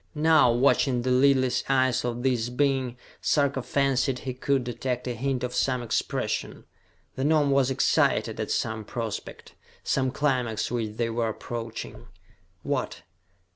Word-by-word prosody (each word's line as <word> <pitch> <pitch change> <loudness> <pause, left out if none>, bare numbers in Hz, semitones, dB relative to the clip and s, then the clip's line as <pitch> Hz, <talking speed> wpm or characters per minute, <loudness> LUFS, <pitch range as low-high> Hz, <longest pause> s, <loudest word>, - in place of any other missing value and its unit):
Now, 155 -4 +5
watching 125 0 +2
the 130 - 0
lidless 130 -1 +3
eyes 130 -2 +2
of 120 0 -3
this 120 -3 +1
being, 130 -1 0 0.2
Sarka 140 -2 +1
fancied 135 -1 +1
he 130 0 -5
could 135 +1 0
detect 125 +1 -3
a 125 - -1
hint 130 +1 -2
of 125 0 -3
some 125 -2 0
expression. 115 - -2 0.5
The 130 - -3
Gnome 150 -1 +3
was 135 -1 +3
excited 135 - +1
at - - -3
some 110 -1 -1
prospect, 115 0 -6 0.3
some 130 -1 +1
climax 125 -6 -1
which 110 -3 -3
they 115 -1 0
were 115 0 0
approaching. 115 +1 -6 0.6
What? - - -3
125 Hz, 140 wpm, -26 LUFS, 120-135 Hz, 0.6 s, Now